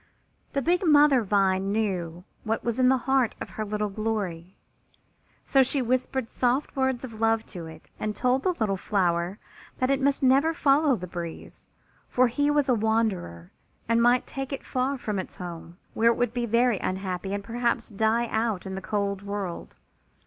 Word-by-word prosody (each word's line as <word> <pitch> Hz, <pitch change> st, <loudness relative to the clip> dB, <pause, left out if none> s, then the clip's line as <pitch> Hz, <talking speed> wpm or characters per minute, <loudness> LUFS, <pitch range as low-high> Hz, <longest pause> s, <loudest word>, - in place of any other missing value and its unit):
The 275 Hz, -1 st, 0 dB
big 355 Hz, +3 st, +2 dB
mother 295 Hz, -5 st, +5 dB
vine 195 Hz, -2 st, +1 dB
knew 180 Hz, -5 st, -2 dB, 0.2 s
what 225 Hz, 0 st, -2 dB
was 235 Hz, +1 st, -2 dB
in 255 Hz, 0 st, +5 dB
the 265 Hz, -, +4 dB
heart 265 Hz, -4 st, +2 dB
of -, -, -7 dB
her 215 Hz, -, -4 dB
little 210 Hz, 0 st, -2 dB
Glory, 195 Hz, -5 st, -3 dB, 0.9 s
so 270 Hz, -, +4 dB
she 270 Hz, +2 st, +1 dB
whispered 255 Hz, 0 st, -1 dB
soft 255 Hz, +6 st, 0 dB
words 265 Hz, -2 st, 0 dB
of 225 Hz, -4 st, -8 dB
love 225 Hz, 0 st, +2 dB
to 170 Hz, -4 st, -6 dB
it 160 Hz, -1 st, -12 dB
and 215 Hz, -1 st, -2 dB
told 250 Hz, +1 st, +1 dB
the 365 Hz, +4 st, 0 dB
little 210 Hz, -7 st, 0 dB
flower 180 Hz, -1 st, 0 dB, 0.4 s
that 255 Hz, +1 st, +1 dB
it 275 Hz, 0 st, +1 dB
must 280 Hz, 0 st, +1 dB
never 275 Hz, +5 st, +4 dB
follow 285 Hz, -1 st, +3 dB
the 180 Hz, -, -6 dB
breeze, 170 Hz, -2 st, -8 dB, 0.4 s
for 255 Hz, -, +3 dB
he 290 Hz, +5 st, +1 dB
was 295 Hz, -1 st, +2 dB
a 255 Hz, -, +4 dB
wanderer 210 Hz, -, -1 dB, 0.4 s
and 230 Hz, +1 st, +3 dB
might 245 Hz, +1 st, +4 dB
take 270 Hz, 0 st, -5 dB
it 275 Hz, -, -5 dB
far 265 Hz, +2 st, -1 dB
from 210 Hz, -5 st, -3 dB
its 185 Hz, -, -7 dB
home, 170 Hz, -1 st, -8 dB, 0.2 s
where 230 Hz, +1 st, +4 dB
it 235 Hz, -, +1 dB
would 245 Hz, -2 st, 0 dB
be 240 Hz, -1 st, -1 dB
very 235 Hz, -2 st, +2 dB
unhappy 190 Hz, 0 st, -3 dB
and 200 Hz, 0 st, -3 dB
perhaps 235 Hz, +1 st, -1 dB
die 220 Hz, +3 st, +1 dB
out 220 Hz, -4 st, -1 dB
in 190 Hz, -, -5 dB
the 190 Hz, -, -5 dB
cold 200 Hz, -1 st, -2 dB
world. 200 Hz, -3 st, -5 dB
225 Hz, 185 wpm, -26 LUFS, 195-255 Hz, 0.9 s, mother